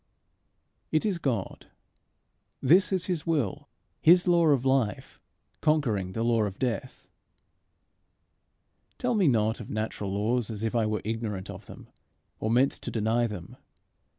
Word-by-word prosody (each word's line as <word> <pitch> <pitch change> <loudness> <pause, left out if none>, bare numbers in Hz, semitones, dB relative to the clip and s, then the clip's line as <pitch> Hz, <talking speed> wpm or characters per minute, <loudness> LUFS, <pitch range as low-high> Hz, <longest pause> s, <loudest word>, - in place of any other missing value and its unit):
It 155 +4 +1
is 195 -5 0
God. 120 - -3 0.9
This 175 +10 +4
is 185 -2 0
his 175 -3 -3
will, 145 - -1 0.3
his 175 +3 +6
law 170 -2 +4
of 140 -4 +3
life 130 -6 0 0.4
conquering 115 -12 +1
the 115 - -2
law 115 -1 +2
of 100 -1 -5
death 130 +1 -3 1.9
Tell 245 -1 0
me 200 -6 +3
not 110 -3 +2
of 115 - -9
natural 110 -2 -3
laws, 110 +4 0
as 110 -1 -5
if 110 - -1
I 115 -2 +1
were 110 0 -2
ignorant 110 -4 -3
of - - -11
them, - - -12 0.5
or 110 - -2
meant 125 +4 +4
to - - -6
deny 115 +2 +1
them. 95 -6 -8
120 Hz, 145 wpm, -27 LUFS, 110-155 Hz, 1.9 s, his